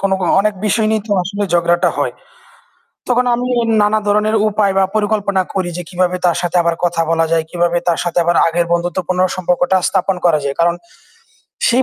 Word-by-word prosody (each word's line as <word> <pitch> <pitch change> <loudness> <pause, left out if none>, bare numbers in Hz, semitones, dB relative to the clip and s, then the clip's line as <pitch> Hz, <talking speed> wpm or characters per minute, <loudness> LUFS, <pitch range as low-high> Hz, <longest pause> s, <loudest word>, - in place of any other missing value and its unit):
কোন, 195 - 0
কোন 180 - -1
অনেক 210 +1 0
বিষয় 215 +2 +1
নিয়ে 220 -1 0
তো 205 - -2
আসলে 200 +3 -4
ঝগড়াটা 175 0 +2
হয়। - - -1 1.0
তখন 250 0 +2
আমি 245 +1 -3 0.3
নানা 210 +1 +2
ধরনের 210 +1 +2
উপায় 205 -2 +1
বা 195 - +4
পরিকল্পনা 205 -2 0
করি 185 -2 -2
যে, 180 - -5
"কিভাবে 180 0 0
তার 175 -2 +2
সাথে 175 0 -3
আবার 170 0 0
কথা 170 -1 +1
বলা 165 0 +2
যায়, 165 -1 +2
কিভাবে 175 0 0
তার 170 - +1
সাথে 175 0 -3
আবার 170 0 +1
আগের 170 +1 0
বন্ধুত্বপূর্ণ 175 +1 -2 0.2
সম্পর্কটা 180 +1 +1
স্থাপন 190 +1 0
করা 160 -3 +3
যায়!" 140 0 -2
কারণ 170 0 +2 0.9
সেই 250 +2 +3
180 Hz, 190 wpm, -16 LUFS, 170-205 Hz, 1.0 s, বা